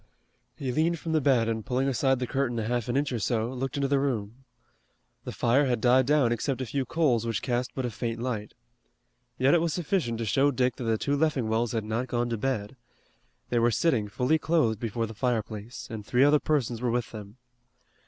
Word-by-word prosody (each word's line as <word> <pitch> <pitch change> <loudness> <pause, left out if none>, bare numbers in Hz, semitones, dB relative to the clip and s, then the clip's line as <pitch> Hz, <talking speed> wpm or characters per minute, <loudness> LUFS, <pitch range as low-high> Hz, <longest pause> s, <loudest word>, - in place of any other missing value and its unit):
He 130 -3 -3
leaned 160 +5 +1
from 165 +1 -5
the 160 -1 +2
bed 130 -5 +3
and 110 -1 -2
pulling 130 +3 0
aside 135 0 +2
the 125 - -2
curtain 130 -2 -1
a 110 - -1
half 120 +1 -1
an 120 - +1
inch 145 0 0
or 120 - -2
so, 115 +2 -1
looked 135 +2 -3
into 140 -1 +1
the 140 0 +2
room. 125 -2 -3 0.8
The - - -4
fire 135 +4 +2
had 125 -2 +1
died 125 +2 +4
down 145 -5 +3
except 125 +3 -1
a 130 - -2
few 135 +2 -2
coals 130 -6 +1
which 115 -2 -2
cast 125 -1 -2
but 130 - -2
a 120 - -2
faint 115 +1 -4
light. 115 -4 -4 0.8
Yet 130 +4 +4
it 170 - +4
was 165 -2 0
sufficient 165 - -1
to 115 - -3
show 135 +7 +3
Dick 125 -2 0
that 125 - -5
the 115 -1 +1
two 140 +6 0
Leffingwells 120 -7 0
had 115 -2 -1
not 115 +4 -2
gone 120 -1 -1
to 115 - -1
bed. 130 -2 -2 0.7
They 120 - +2
were 115 +1 +4
sitting 115 -2 +1
fully 130 +9 +1
clothed 135 -11 +1
before 115 0 -2
the 110 - -8
fireplace, 110 -1 -3
and 110 -2 -5
three 125 +5 +2
other 145 +1 +5
persons 125 -7 -1
were 125 - 0
with 120 0 -1
them. 105 0 -9
125 Hz, 220 wpm, -27 LUFS, 115-135 Hz, 0.8 s, other